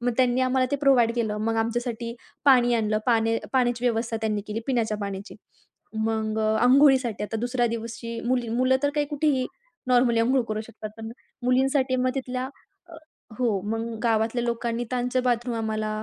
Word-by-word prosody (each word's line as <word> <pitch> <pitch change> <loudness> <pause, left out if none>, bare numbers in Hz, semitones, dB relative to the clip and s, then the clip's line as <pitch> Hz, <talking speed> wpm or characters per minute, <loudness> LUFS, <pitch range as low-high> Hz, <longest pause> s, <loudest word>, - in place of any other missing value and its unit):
मग 245 0 0
त्यांनी 255 0 +3
आम्हाला 255 0 +2
ते 285 - +1
प्रोव्हाईड 260 -5 +4
केलं. 220 -3 -1
मग 225 +1 0
आमच्यासाठी 235 +1 -2 0.3
पाणी 245 -3 +5
आणलं, 215 -2 +1
पाने 225 -1 +2
पाण्याची 245 -2 +1
व्यवस्था 230 -1 0
त्यांनी 215 -2 -1
केली 215 +1 -3
पिण्याच्या 230 -5 0
पाण्याची. 200 0 -6 0.6
मग 220 0 -1
अ, 220 0 +2
अंघोळीसाठी 260 -4 +4
आता 225 - -4
दुसऱ्या 245 0 0
दिवशी 230 0 -5
मुली 245 -2 0
मुलं 255 +3 +2
तर 285 - +2
काही 295 -1 +1
कुठेही 290 -3 +1 0.4
नॉर्मली 245 -2 +4
अंघोळ 255 +2 +3
करू 215 0 -2
शकतात, 220 -1 -9
पण 225 0 -7 0.3
मुलींसाठी 260 +1 +2
मग 255 0 +1
तिथल्या 255 -1 -3 0.4
अ, - - -11 0.4
हो, 230 -6 +1
मग 225 0 -1 0.2
गावातल्या 225 +1 +1
लोकांनी 235 0 -2
त्यांचं 250 0 0
बाथरूम 240 -1 0
आम्हाला 215 -1 -2
235 Hz, 165 wpm, -25 LUFS, 225-255 Hz, 0.6 s, पाणी